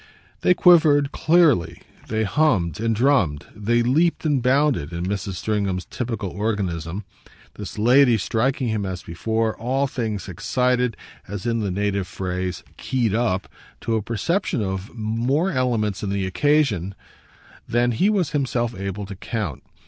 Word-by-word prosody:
They 180 - +3
quivered, 155 -6 +5
clearly, 150 - +2 0.2
they 110 0 0
hummed 100 - +1
and 115 0 0
drummed, 105 - +2
they 120 +3 +1
leaped 160 +8 +2
and 145 -4 +2
bounded 130 - +2
in 85 +1 -3
Mrs. 100 0 -3
Stringham's 95 -1 -2
typical 115 -6 -4
organism 95 -3 -2 0.5
this - - -8
lady 120 +2 +5
striking 120 +4 0
him 110 -2 -1
as 95 -3 -5
before 110 +7 -1
all 130 +4 0
things 110 -7 -3
excited, 125 +5 0 0.3
as, 100 +2 -6
in 115 -1 0
the 105 -2 -1
native 100 0 -1
phrase, 90 -1 -4
keyed 120 -5 -1
up, 110 -5 0 0.3
to 115 - -1
a 110 - 0
perception 125 - -1
of 95 +1 -4
more 120 - 0
elements 115 - 0
in 100 - -3
the 100 -1 -1
occasion 105 - +1 0.7
than 120 +1 +2
he 185 - +2
was 185 -8 +1
himself 125 -5 -1
able 100 0 -5
to 100 0 -8
count. 105 - -4
110 Hz, 145 wpm, -23 LUFS, 95-130 Hz, 0.7 s, quivered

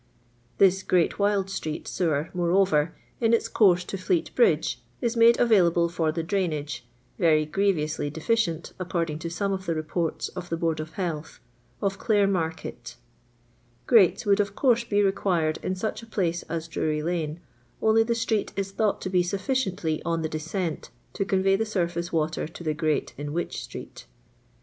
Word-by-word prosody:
This 190 -1 +5
Great 180 0 +1
Wyld 200 -1 +2
street 155 -5 -4
■ewer, 160 -4 -1
moreover^ 175 -3 +2 0.3
in 230 -1 +4
its - - -1
course 180 -4 +4
to 195 +2 -6
Fleet 330 - 0
Bridge, 475 - +2 0.2
is 235 -2 -1
made 230 0 +6
available 175 -7 +4
for 165 -2 0
the 165 +1 -3
drainage 155 -8 -2 0.3
(very 155 -3 +4
grievously 155 -4 0
deficient, 170 +1 -1
according 170 -4 -2
to 170 - -4
some 195 +4 -1
of 190 0 -5
the 165 - 0
reporu 155 +1 -2
of 175 -1 -6
the 165 - -1
Board 165 -1 0
of 155 0 -6
Health) 160 -5 -4 0.4
of 195 -1 -1
Clare 205 -3 +3
market 165 -5 -3 0.9
Grates 225 +1 +5
would 200 -1 +3
of 200 -1 0
course 240 -4 +3
be 205 -3 +1
required 175 -5 +1
in 185 - -2
such 215 +5 -3
a 230 - -12
place 175 -6 -1
as 165 0 -3
Drury 155 -1 -1
lane, 165 -2 -2 0.4
only 220 +1 +4
the 230 +1 +1
street 225 -2 0
is 195 0 -2
thought 210 +1 0
to - - -3
be 180 -1 +4
sufficiently 185 - -1
on 165 -1 -1
the 160 - -1
descent 160 +2 -3 0.2
to - - -1
convey 195 0 +2
the 215 - +1
surface 175 -5 -2
water 155 -1 -1
to 165 +2 -11
the 155 -2 0
grate 155 0 -1
in 145 0 -4
Wych 175 +1 -2
street. - - -9
175 Hz, 170 wpm, -26 LUFS, 160-200 Hz, 0.9 s, made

